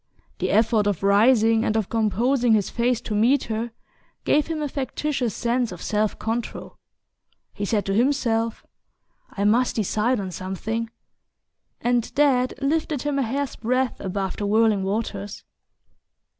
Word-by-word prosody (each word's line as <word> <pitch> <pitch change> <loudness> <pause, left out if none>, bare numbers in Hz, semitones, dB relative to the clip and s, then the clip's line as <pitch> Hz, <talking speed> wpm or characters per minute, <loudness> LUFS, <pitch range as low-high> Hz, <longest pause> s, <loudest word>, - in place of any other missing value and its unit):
The - - -1
effort 220 0 +3
of 200 -3 -1
rising, 225 +2 +4
and 220 -2 +1
of 215 -4 0
composing 235 +3 +1
his 205 -3 +1
face 240 0 +1
to 215 - -5
meet 235 +7 +3
her, 225 +1 -3 0.6
gave 295 0 +3
him 315 -2 -3
a - - -1
factitious 270 -3 -2
sense 240 -1 0
of 180 - -8
self 210 +2 -1
control. 225 +2 -4 0.7
He 205 - -3
said 205 0 0
to 195 - -1
himself: 230 -2 0 0.6
"I 200 - -4
must 235 +5 +2
decide 220 +2 +1
on 190 -2 -4
something 195 +6 -4 0.5
" - - -52
and 240 -1 +1
that 260 -3 +2
lifted 300 -1 0
him 290 -1 0
a - - +2
hair's 270 +2 -2
breadth 255 +2 -1
above 190 0 -3
the 205 - -2
whirling 215 -1 +3
waters. 200 0 -3
225 Hz, 150 wpm, -23 LUFS, 210-255 Hz, 0.7 s, rising